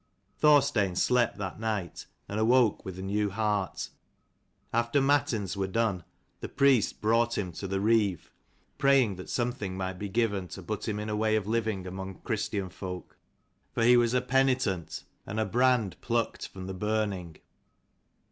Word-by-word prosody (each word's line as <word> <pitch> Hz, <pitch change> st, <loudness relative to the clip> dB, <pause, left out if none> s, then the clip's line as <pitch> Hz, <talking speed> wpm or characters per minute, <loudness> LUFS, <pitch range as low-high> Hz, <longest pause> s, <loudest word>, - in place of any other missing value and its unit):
Thorstein 140 Hz, -11 st, +4 dB
slept 120 Hz, +4 st, +2 dB
that 95 Hz, -1 st, -5 dB
night, 105 Hz, -5 st, -3 dB, 0.2 s
and 105 Hz, -, -3 dB
awoke 120 Hz, 0 st, +3 dB
with 95 Hz, -1 st, -7 dB
a 95 Hz, -, -6 dB
new 105 Hz, +2 st, 0 dB
heart. 105 Hz, -2 st, -1 dB, 0.8 s
After 120 Hz, +4 st, +2 dB
matins 135 Hz, -, +1 dB
were 95 Hz, -1 st, -1 dB
done 100 Hz, -3 st, 0 dB, 0.4 s
the -, -, -6 dB
priest 135 Hz, -5 st, +3 dB
brought 115 Hz, +2 st, +2 dB
him 95 Hz, -4 st, -2 dB
to 95 Hz, +4 st, -6 dB
the 95 Hz, +1 st, -1 dB
Reeve, 105 Hz, -5 st, +1 dB, 0.5 s
praying 135 Hz, -8 st, +4 dB
that 90 Hz, -, -9 dB
something 115 Hz, -6 st, -2 dB
might 95 Hz, -1 st, -4 dB
be 100 Hz, -, -4 dB
given 100 Hz, -3 st, 0 dB
to 95 Hz, -, -9 dB
put 105 Hz, +4 st, -4 dB
him 105 Hz, -1 st, -2 dB
in 105 Hz, -, -4 dB
a 105 Hz, -, -1 dB
way 110 Hz, 0 st, +2 dB
of 110 Hz, -3 st, 0 dB
living 110 Hz, -3 st, -1 dB
among 95 Hz, +1 st, -6 dB
Christian 105 Hz, -4 st, -2 dB
folk, 90 Hz, -1 st, -7 dB, 0.6 s
for 115 Hz, -, +1 dB
he 120 Hz, +1 st, +7 dB
was 120 Hz, 0 st, +3 dB
a 125 Hz, -, +3 dB
242 130 Hz, 0 st, +2 dB
penitent 85 Hz, -4 st, -6 dB, 0.2 s
and 105 Hz, +2 st, -3 dB
a 110 Hz, -, +1 dB
brand 120 Hz, -1 st, +1 dB
plucked 115 Hz, -1 st, -1 dB
from 95 Hz, -1 st, -9 dB
the 95 Hz, -, -5 dB
burning. 100 Hz, -4 st, -2 dB
105 Hz, 165 wpm, -29 LUFS, 95-120 Hz, 0.8 s, he